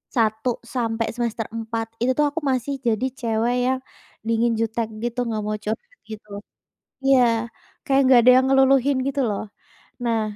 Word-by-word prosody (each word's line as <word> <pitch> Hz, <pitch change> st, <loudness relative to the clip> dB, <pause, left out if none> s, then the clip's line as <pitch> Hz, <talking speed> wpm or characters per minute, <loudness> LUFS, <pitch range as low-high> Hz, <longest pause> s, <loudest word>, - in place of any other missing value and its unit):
1 220 Hz, +1 st, +1 dB, 0.3 s
sampai 230 Hz, -2 st, -1 dB
semester 235 Hz, -2 st, -2 dB
4 225 Hz, 0 st, -3 dB
itu 255 Hz, +2 st, +3 dB
tuh 300 Hz, -, +4 dB
aku 325 Hz, +3 st, -4 dB
masih 260 Hz, +2 st, -1 dB
jadi 225 Hz, +3 st, +1 dB
cewek 230 Hz, +1 st, 0 dB
yang 260 Hz, 0 st, +1 dB, 0.5 s
dingin, 230 Hz, +1 st, +2 dB
jutek, 225 Hz, 0 st, -1 dB, 0.2 s
gitu 240 Hz, +1 st, -3 dB
nggak 215 Hz, -2 st, -2 dB
mau 215 Hz, 0 st, -2 dB
curhat 485 Hz, -, -5 dB
gitu. 210 Hz, -1 st, -9 dB, 0.8 s
Iya, 270 Hz, -2 st, +5 dB, 0.6 s
kayak 275 Hz, 0 st, +3 dB
nggak 255 Hz, -2 st, +7 dB
ada 250 Hz, +2 st, +7 dB
yang 260 Hz, -, +3 dB
ngeluluhin 270 Hz, 0 st, +4 dB
gitu 275 Hz, 0 st, -1 dB
loh. 205 Hz, -, -3 dB, 0.6 s
Nah 230 Hz, -2 st, +1 dB
235 Hz, 155 wpm, -23 LUFS, 225-260 Hz, 0.8 s, nggak